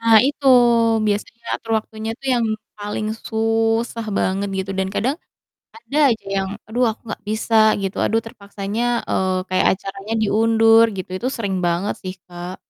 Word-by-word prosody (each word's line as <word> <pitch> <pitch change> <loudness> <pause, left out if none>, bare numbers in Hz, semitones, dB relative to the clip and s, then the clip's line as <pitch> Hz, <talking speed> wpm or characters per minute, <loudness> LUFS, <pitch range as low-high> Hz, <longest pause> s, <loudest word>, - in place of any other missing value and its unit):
Nah 230 -1 +5
itu 285 0 -3 0.6
biasanya 210 +3 -3
atur 225 - -7
waktunya 220 +1 -6
itu 270 - -22
yang 240 -1 +1 0.3
paling 210 +1 -3 0.2
susah 225 +1 0
banget 195 +2 0
gitu 190 +1 -3
dan 190 - 0
kadang 265 +5 0 0.6
ada 300 -10 -5
aja 225 -2 -2
yang, 190 0 -1 0.2
"Aduh 240 +3 0
aku 220 - -13
gak - - -9
bisa," 220 +1 -1 0.3
gitu, 195 0 -3
"aduh 225 - +2
terpaksanya," 200 0 -5 0.3
eee, 185 -1 0
"kayak 185 0 +2
acaranya 195 +2 -6
diundur." 225 +1 +5
Gitu, 185 - -5
itu 245 - -3
sering 200 -4 -2
banget 175 +3 0
sih, 185 -1 -4
Kak. 175 +1 -8
215 Hz, 155 wpm, -20 LUFS, 195-225 Hz, 0.6 s, Nah